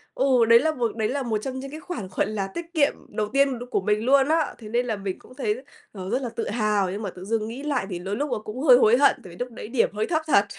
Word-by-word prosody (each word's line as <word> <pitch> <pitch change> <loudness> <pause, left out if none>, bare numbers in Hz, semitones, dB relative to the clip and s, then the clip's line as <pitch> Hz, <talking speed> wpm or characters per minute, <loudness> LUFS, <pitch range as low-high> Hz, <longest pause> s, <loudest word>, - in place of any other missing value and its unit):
ừ, 255 -3 +4
đấy 230 0 +9
là 315 +4 +1
một 240 -6 -2
đấy 220 -1 0
là 275 +1 -1
một 225 -3 0
trong 260 +4 -5
những 275 +1 -7
cái 310 - -7
khoản, 240 - -6
gọi - - +1
là, 205 -2 -2
tiết 330 - -6
kiệm 290 -3 +3 0.2
đầu 210 0 -2
tiên 275 -3 +3
được 245 - -6
của - - +1
mình 210 +2 0
luôn 270 +1 +5
á, 325 +1 +1
thế 215 -3 -10
nên 240 +2 +1
là 225 -3 -1
mình 195 -2 -5
cũng 255 - -17
thấy, 425 - -2 0.3
ờ, 190 -2 -7
rất 255 +4 0
là 245 - -3
tự 230 0 -4
hào. 210 -4 +1
Nhưng 205 +3 -4
mà 200 - -3
tự 180 +1 -10
dưng 220 +1 -1
nghĩ 245 +6 -7
lại 280 -9 -1
thì 175 -3 -4
đôi 195 +3 -3
lúc 290 +2 -2
là - - 0
cũng 225 +5 -6
hơi 250 -5 +8
hối 235 -1 +5
hận, 280 +1 +5
tại 185 - -11
vì - - -12
lúc 245 0 -4
đấy 220 - -8
điểm 235 0 +2
hơi 215 - 0
thấp 315 -2 +1
thật. 205 -8 +5
235 Hz, 310 wpm, -25 LUFS, 210-270 Hz, 0.3 s, đấy